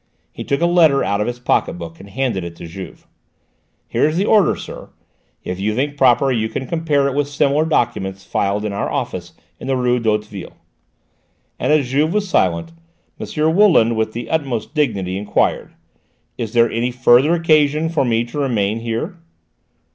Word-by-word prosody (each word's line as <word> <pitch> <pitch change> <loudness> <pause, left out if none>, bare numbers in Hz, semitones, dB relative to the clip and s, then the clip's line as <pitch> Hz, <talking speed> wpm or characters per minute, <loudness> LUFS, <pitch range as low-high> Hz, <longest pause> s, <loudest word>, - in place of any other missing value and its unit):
He - - -7
took 140 +3 -1
a - - +4
letter 165 -5 +4
out 100 +1 0
of - - -1
his 120 0 -3
pocket 125 - 0
book, 85 -1 -9
and 100 +1 -12
handed 115 -4 -2
it 85 -1 -7
to - - -10
Juve. 90 +3 -10 0.8
"Here - - +2
is 155 +2 -2
the 195 - +1
order, 210 -6 +4
sir; - - -9 0.5
if 90 +1 -5
you 105 +2 -1
think 145 +3 -1
proper 130 -1 +3
you 110 -3 0
can 130 +4 -4
compare 150 -3 0
it 140 - -2
with 145 0 -1
similar 145 +2 +1
documents 100 - -1
filed 100 +2 -1
in 105 - -3
our 100 - -2
office - - -4 0.3
in - - -8
the 135 -1 +1
rue 125 0 +1
d'Hauteville"; 105 -4 -2 1.1
and - - 0
as 150 -4 +3
Juve 150 +7 +1
was 210 -1 0
silent, 90 - +1 0.5
Mr. 155 +1 0
Wooland, 170 - +5
with 110 0 -1
the 120 0 -5
utmost 135 -7 -2
dignity, 100 - -1
enquired: 105 - -1 0.6
"Is 110 -2 -5
there 115 -1 +4
any 120 +2 0
further 125 +5 +4
occasion 155 -2 +2
for 160 -3 0
me 115 -2 +1
to 120 +5 -6
remain 110 -6 0
here?" 115 - -4
125 Hz, 180 wpm, -19 LUFS, 105-150 Hz, 1.1 s, Wooland